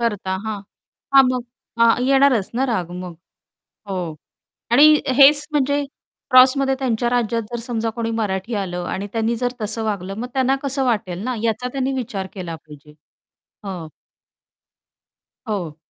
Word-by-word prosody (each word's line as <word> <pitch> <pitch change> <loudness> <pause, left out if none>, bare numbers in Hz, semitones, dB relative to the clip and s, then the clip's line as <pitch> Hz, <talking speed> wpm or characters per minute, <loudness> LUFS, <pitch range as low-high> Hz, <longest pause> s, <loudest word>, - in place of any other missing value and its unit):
करता, 205 -5 -1
हां. 215 -2 -3 0.5
हां 270 - +9
मग 255 -1 -1 0.4
हां, 230 0 +7
येणारच 270 -6 +3
ना, 260 +3 +1
राग 180 -7 -2
मग. 180 -2 -8 0.8
हो 195 - -2 0.8
आणि 285 +5 +8 0.3
हेच 290 +1 +7
म्हणजे 285 0 +1 0.5
क्रॉसमध्ये 265 +1 +6
त्यांच्या 240 -3 0
राज्यात 235 -1 0
जर 240 - -3
समजा 230 -1 -2
कोणी 230 -1 -2
मराठी 205 +2 -2
आलं 180 -3 -4
आणि 200 - -3
त्यांनी 225 +1 0
जर 245 +1 -1
तसं 220 +1 -2
वागलं? 195 -3 -3
मग 245 +2 -4
त्यांना 265 0 +2
कसं 275 -1 -1
वाटेल 205 -8 -1
ना, 255 +1 -1
याचा 230 +2 -1
त्यांनी 270 0 -1
विचार 220 -7 -4
केला 175 -4 -6
पाहिजे. 150 -1 -16 0.7
हो. 180 -5 -6 1.6
हो. 175 -8 -3
230 Hz, 145 wpm, -21 LUFS, 195-255 Hz, 1.6 s, हां